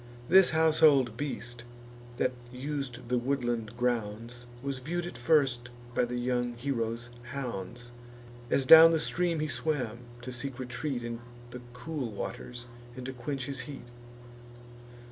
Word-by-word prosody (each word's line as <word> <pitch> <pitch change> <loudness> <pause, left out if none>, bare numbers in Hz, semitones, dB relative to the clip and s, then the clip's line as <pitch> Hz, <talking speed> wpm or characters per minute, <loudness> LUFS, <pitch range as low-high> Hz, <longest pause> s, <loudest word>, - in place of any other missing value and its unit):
This 190 +1 +7
household 155 -6 +4
beast, 120 -3 -5 0.5
that 130 - +2 0.2
us'd 130 -2 -5
the 125 0 +1
woodland 120 -3 -1
grounds, 120 0 -2 0.2
Was 135 -1 -3
view'd 170 +6 -3
at 175 - -7
first 120 -2 +2 0.2
by 125 - +2
the 125 0 -3
young 120 -1 0
hero's 120 -2 -3
hounds, 120 -2 -6 0.6
As 135 - +2
down 165 +3 +10
the 160 - +3
stream 170 0 0
he 155 - 0
swam, 125 -3 -2 0.2
to 130 - -5
seek 125 +1 -4
retreat 125 0 -3
In 115 0 -4 0.3
the 125 0 -7
cool 125 0 -4
waters, 120 +4 -6 0.3
and 130 -1 -7
to 130 - -4
quench 135 +1 -4
his 140 -1 -4
heat. 140 -3 -7
125 Hz, 140 wpm, -30 LUFS, 120-140 Hz, 0.6 s, down